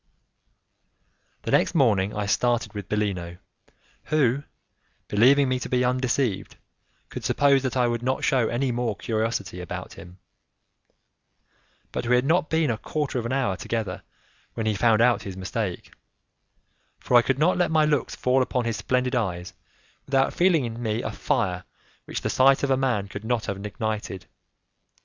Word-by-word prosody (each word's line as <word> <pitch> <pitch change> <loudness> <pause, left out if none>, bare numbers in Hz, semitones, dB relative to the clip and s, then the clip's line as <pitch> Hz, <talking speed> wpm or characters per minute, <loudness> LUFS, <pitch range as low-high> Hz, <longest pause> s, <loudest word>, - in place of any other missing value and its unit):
The - - -3
next - - +2
morning 105 - +2
I 105 -1 -2
started 120 +4 0
with 100 -2 -7
Bellino, 95 -5 -2 0.7
who, 140 -3 +2 0.7
believing 130 +7 +4
me 130 0 0
to - - -6
be 125 0 +2
undeceived, 125 -4 -1 0.5
could - - -7
suppose 140 -1 +3
that 130 -1 -2
I 125 - +3
would 120 -1 -1
not 130 +4 -1
shew 130 -6 +2
any 125 +2 0
more 120 -3 -1
curiosity 110 -5 -2
about 90 - -7
him, 90 +1 -13 1.7
but 120 - -3
we 125 - +4
had 125 +1 +2
not 160 +1 +2
been 160 -4 +2
a 110 - -3
quarter 145 -4 -2
of 115 - -3
an - - -4
hour 130 -8 0
together 110 +3 -4 0.5
when 115 - -2
he 110 - +1
found 115 +1 +3
out 120 -1 +3
his 95 -2 -7
mistake, 95 0 -4 1.0
for 125 - -1
I 120 - +9
could 130 +2 0
not 160 +5 +3
let 175 - +2
my 155 -1 +3
looks 145 -4 0
fall 130 +1 +2
upon 125 -1 -1
his 115 -2 -1
splendid 125 +5 0
eyes 90 -7 -2 0.5
without 135 -1 +2
feeling 175 -6 +3
in 115 0 -6
me 110 0 -1
a - - -3
fire 100 -10 -1 0.4
which - - -5
the - - -2
sight 135 +1 +4
of 140 - +1
a - - +5
man 125 -7 0
could 100 +2 -8
not 115 0 -1
have 100 0 -4
ignited. 105 -3 -4
120 Hz, 170 wpm, -25 LUFS, 105-135 Hz, 1.7 s, I